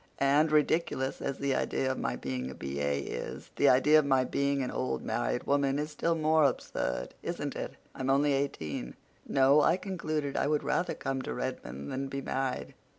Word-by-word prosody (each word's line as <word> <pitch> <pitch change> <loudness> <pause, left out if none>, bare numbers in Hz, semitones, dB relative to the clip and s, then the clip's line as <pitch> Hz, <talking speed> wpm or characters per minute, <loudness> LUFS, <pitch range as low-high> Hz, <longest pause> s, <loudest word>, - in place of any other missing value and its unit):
And, 145 +3 +3
ridiculous 150 -3 +1
as 140 -1 -2
the 140 -1 0
idea 130 0 0
of 130 - -4
my - - -1
being 65 -1 -4
a 65 - -8
B.A. 70 +1 -2
is, - - -6
the - - +5
idea 150 +4 +6
of 150 - +1
my 135 -2 +4
being 140 +1 0
an 125 - -3
old 130 - -2
married 120 +2 -1
woman 140 -1 +2
is 150 +1 -2
still 165 +2 0
more 155 0 +3
absurd, 125 - -1
isn't - - -4
it? - - -5 0.2
I'm 130 0 -3
only 140 +1 +3
eighteen. 80 - -3 0.3
No, 135 +2 +5
I 165 +4 +4
concluded 155 -7 -3
I - - +1
would 150 0 +1
rather 180 - 0
come 135 -1 -2
to - - -4
Redmond 70 +1 -5
than 135 +1 -2
be 135 +1 -4
married. 135 -1 -2
135 Hz, 190 wpm, -30 LUFS, 130-150 Hz, 0.3 s, idea